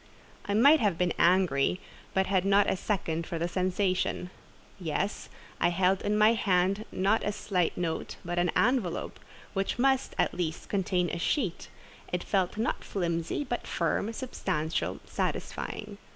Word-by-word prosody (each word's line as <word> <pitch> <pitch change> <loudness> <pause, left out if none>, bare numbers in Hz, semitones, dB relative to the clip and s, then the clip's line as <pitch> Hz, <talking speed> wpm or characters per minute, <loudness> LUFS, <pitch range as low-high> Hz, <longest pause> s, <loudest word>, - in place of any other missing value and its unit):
I 200 - 0
might 285 +8 +7
have 205 -7 +1
been 180 -1 +1
angry, 175 -3 +3 0.4
but 190 0 +3
had 190 -2 +1
not 200 +1 +4
a - - +2
second 170 -5 -2
for 170 - -3
the 170 +1 -1
sensation. 185 0 0 0.5
Yes: 180 +4 -2 0.3
I - - +4
held 185 +2 +2
in 210 +1 0
my 215 +2 +6
hand 195 -1 +1
not 200 +4 +2
a 205 - 0
slight 185 -4 -1
note, 165 -2 -2
but 175 0 -1
an 175 0 +2
envelope, 220 -8 +1 0.3
which 195 +3 -1
must, 265 +1 +2
at - - +2
least, 165 -3 -3
contain 185 -3 0
a - - -3
sheet: 195 - -1 0.4
it 180 0 -1
felt 190 -1 0
not 225 +2 -1
flimsy, 170 - -2
but 245 -3 -4
firm, 180 +5 0
substantial, 170 - -2
satisfying. 210 -1 -4
190 Hz, 150 wpm, -29 LUFS, 175-210 Hz, 0.5 s, might